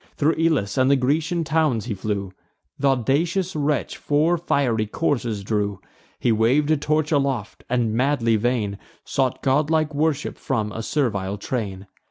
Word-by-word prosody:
Thro' 150 +2 +3
Elis 155 -12 +1
and 130 +1 +4
the 140 - +5
Grecian 155 +6 0
towns 150 -8 +1
he 120 - -2
flew; 100 -1 -3 0.5
Th' - - +1
audacious 160 - +1
wretch 145 -1 -1
four 155 +4 +2
fiery 130 -10 0
coursers 120 -6 -1
drew: 100 -2 -1 0.4
He 120 - +2
wav'd 125 +8 +3
a 155 - +4
torch 155 +1 0
aloft, 135 -7 -1
and, 120 -3 +1
madly 125 -2 +2
vain, 105 -3 -1 0.3
Sought 130 -2 -1
godlike 150 +3 +2
worship 150 0 -1
from 110 -5 -1
a 115 - -5
servile 105 -7 -1
train. 100 -4 -4
130 Hz, 150 wpm, -23 LUFS, 110-150 Hz, 0.5 s, the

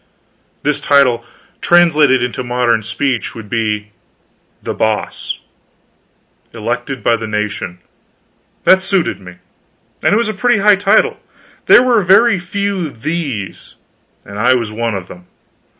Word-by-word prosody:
This - - 0
title, 125 -5 +3 0.4
translated 155 -7 +4
into 125 +1 -3
modern 120 -2 +1
speech, 120 +3 -3
would 110 -3 -10
be 105 -2 -2 0.7
THE - - -3
BOSS. 110 -1 -2 1.2
Elected 120 +4 -4
by 120 - +3
the 110 -1 -5
nation. 105 -4 -4 0.9
That 190 0 +5
suited 185 - 0
me. 90 -1 -12 0.7
And - - +2
it - - +3
was 235 -1 0
a 215 - -2
pretty 240 +2 +1
high 210 +1 +5
title. 200 0 +2 0.5
There 245 - +7
were 240 -4 +3
very 195 +3 +4
few 195 -1 -3
THE'S, 135 - -5 0.5
and 100 +1 -8
I 125 +4 +4
was 115 -4 -2
one 115 0 -2
of 95 -2 -6
them. 90 0 -13
125 Hz, 135 wpm, -15 LUFS, 110-185 Hz, 1.2 s, There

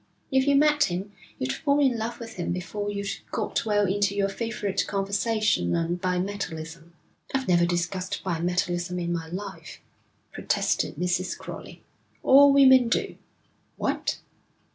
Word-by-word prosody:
If 265 +1 +2
you 280 - +4
met 295 +1 +4
him 185 +3 -4 0.3
you'd 130 +1 -2
fall 285 -2 +1
in 265 -4 +3
love 230 +1 -4
with 225 -3 -9
him 175 - -2
before 185 +4 -3
you'd 200 -1 -4
got - - -2
well 205 -1 +3
into 200 +1 +1
your 200 -1 +1
favourite 205 -1 -2
conversation 200 - 0
on 170 +1 0
bimetallism.' 180 -3 -4 0.4
'I've 265 -1 -1
never 175 -1 +4
discussed 180 +2 -2
bimetallism 175 0 -1
in 175 0 -2
my 165 -1 -4
life,' 195 +2 -7 0.5
protested - - 0
Mrs. 180 +1 -1
Crowley. - - -10 0.4
'All 280 +1 +7
women 260 -3 +6
do.' - - -1 0.6
'What?' - - -1
195 Hz, 140 wpm, -26 LUFS, 175-230 Hz, 0.6 s, All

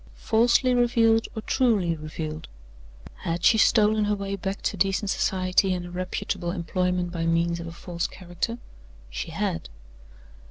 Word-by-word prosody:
Falsely 240 +3 +3
revealed, 230 -2 +3
or 220 - -5
truly 210 -11 +2
revealed? 155 0 -6 0.7
Had 170 +1 -3
she 220 - +6
stolen 215 -1 +4
her 210 0 +1
way 200 0 -3
back 195 0 -4
to - - -1
decent 195 +1 +1
society 185 0 +1
and 175 -1 -5
a 175 - -9
reputable 185 0 -3
employment 180 0 -1
by 165 -1 -2
means 170 +1 +1
of 170 - -6
a - - -6
false 170 0 -4
character? 180 +6 -4 0.5
She - - -4
had. 80 - -3
185 Hz, 150 wpm, -25 LUFS, 170-210 Hz, 0.7 s, she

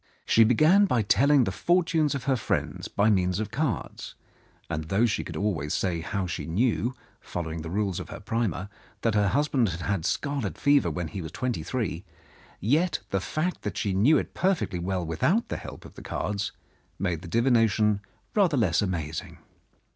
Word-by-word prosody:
She 115 - +6
began 155 - +5
by 125 - +1
telling 135 +7 +4
the 95 - -1
fortunes 165 - +2
of 135 - -4
her 135 - +2
friends 115 - -2
by 105 +2 +2
means 90 -1 +1
of 110 -1 -3
cards, 125 - -3 0.5
and, 80 +1 -3
though 100 +8 +2
she 110 - 0
could - - -7
always 80 -8 -1
say 90 -3 0
how 100 +3 -2
she 85 -1 -4
knew, 120 +7 +1 0.2
following 80 -2 -5
the 80 - -6
rules 100 0 -1
of - - -7
her - - -7
primer, 110 -5 -2 0.3
that 115 - +1
her 105 -1 +3
husband 135 -1 +2
had 85 0 -5
had 100 -2 -1
scarlet 140 -8 -1
fever 140 -9 +3
when 80 +1 -3
he 95 - -5
was 80 - -7
twenty 125 -9 -2
three, 95 -1 -3 0.6
yet 155 - +2
the 95 - +1
fact 165 - -2
that - - -4
she 100 -4 0
knew 120 +12 +5
it - - -3
perfectly 185 - 0
well 90 0 -2
without 155 - +1
the - - -2
help - - -9
of - - -12
the - - -11
cards 100 -1 -3 0.5
made 90 -4 -1
the 90 - -9
divination 110 -2 +3 0.3
rather 185 -9 +3
less 95 -9 +2
amazing. 80 -6 -3
105 Hz, 185 wpm, -27 LUFS, 90-135 Hz, 0.6 s, She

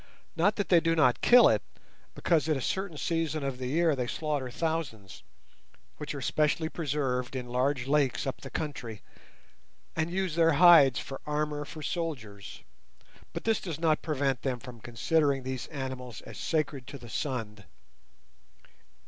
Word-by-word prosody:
Not 205 +6 +3
that 205 - -2
they 175 - +7
do 165 0 +1
not 130 -6 +3
kill 245 0 +8
it, - - +3 0.5
because 160 -2 +1
at 155 - +2
a - - -3
certain 190 +4 -2
season 160 -1 -1
of 135 -2 -3
the 130 - -3
year 160 +3 +2
they 125 -2 -2
slaughter 145 -2 -2
thousands—which 145 - -6
are 140 - -5
specially 155 +3 +1
preserved 135 -6 -2
in 125 -1 -4
large 130 +1 0
lakes 140 -2 +1
up 135 - -4
the 135 - -8
country—and 145 - -7
use 185 -1 -1
their 165 0 +4
hides 150 -5 +7
for 135 - -6
armour 150 0 -1
for 155 +1 -9
soldiers; 120 - -5 0.7
but - - -6
this 225 -2 +1
does 165 -4 -5
not 160 -2 +2
prevent 140 -5 -1
them 130 -2 -1
from 120 -2 -11
considering 135 +4 +1
these 130 -1 -4
animals 130 -5 -6
as 110 -5 -10
sacred 145 -5 -1
to 140 - -7
the 120 -2 -12
sun. 110 -5 -4
145 Hz, 155 wpm, -29 LUFS, 125-160 Hz, 0.7 s, kill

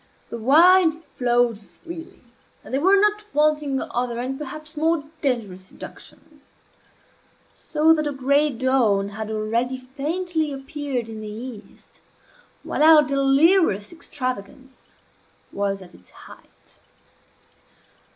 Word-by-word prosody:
The 235 - -5
wine 330 +8 +6
flowed 245 -7 -1
freely, 335 - -12 0.4
and - - -11
there 270 - +1
were 390 +4 +5
not 420 +1 +2
wanting 300 -2 +2
other 240 -1 -2
and 255 +2 -3
perhaps 305 +2 -8
more 320 0 +1 0.2
dangerous 215 -9 -2
seductions; 300 +9 -13 1.1
so 315 +1 +2
that 305 -1 -1
the 295 - -1
gray 280 +2 +2
dawn 235 -6 +1
had 215 +1 -6
already 230 +4 -1
faintly 310 +5 -3
appeared 270 -3 -4
in 220 -1 -8
the 215 - -7
east 220 -1 -10 0.6
while - - -3
our 310 -1 +8
delirious 275 - +3
extravagance 265 -4 -7 0.6
was 195 -1 -2
at 175 - -16
its 90 - -19
height. - - -17
270 Hz, 115 wpm, -23 LUFS, 235-310 Hz, 1.1 s, our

